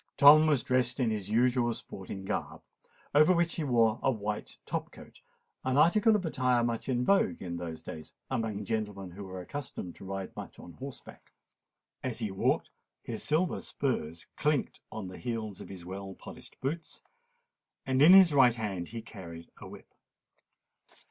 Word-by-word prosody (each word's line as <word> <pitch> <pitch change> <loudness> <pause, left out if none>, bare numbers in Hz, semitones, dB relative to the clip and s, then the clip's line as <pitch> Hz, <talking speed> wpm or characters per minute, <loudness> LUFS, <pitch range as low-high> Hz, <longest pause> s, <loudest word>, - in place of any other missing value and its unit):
Tom 155 +2 +9
was 145 -6 +2
dressed 125 0 +1
in 120 -4 +2
his 105 -2 -3
usual 120 +1 +3
sporting 95 0 -8
garb, - - -4 0.5
over 150 +5 +6
which 170 0 +1
he 165 - -1
wore 115 -5 +3
a - - +2
white 105 -4 -3
top - - -3
coat—an 130 +1 -7
article 210 +8 +5
of 195 -4 -1
attire 125 -6 +2
much 115 +2 -2
in 125 -1 +1
vogue 200 0 +3
in 85 -2 -5
those 85 -2 -6
days 80 -1 -8 0.2
amongst 110 -5 -2
gentlemen 105 -4 -3
who 100 +3 -8
were 95 -1 -7
accustomed 105 -5 -6
to - - -14
ride 95 0 -5
much - - -8
on 85 - -11
horseback. 135 +1 -10 0.7
As 130 -3 -3
he 110 -4 -3
walked, 95 - 0 0.3
his 115 - -5
silver 165 +3 +1
spurs 85 - -3
clinked 150 -2 0
on 110 -4 -5
the 90 - -9
heels 110 -5 -4
of - - -10
his 90 -3 -9
well 95 +1 -7
polished - - -12
boots; 155 +5 -4 0.9
and 130 0 +1
in 165 +5 +9
his 190 -5 +8
right 125 -4 +6
hand 100 -7 -3
he 115 0 -7
carried 85 -7 -10
a - - -9
whip. - - -13
115 Hz, 170 wpm, -30 LUFS, 95-135 Hz, 0.9 s, Tom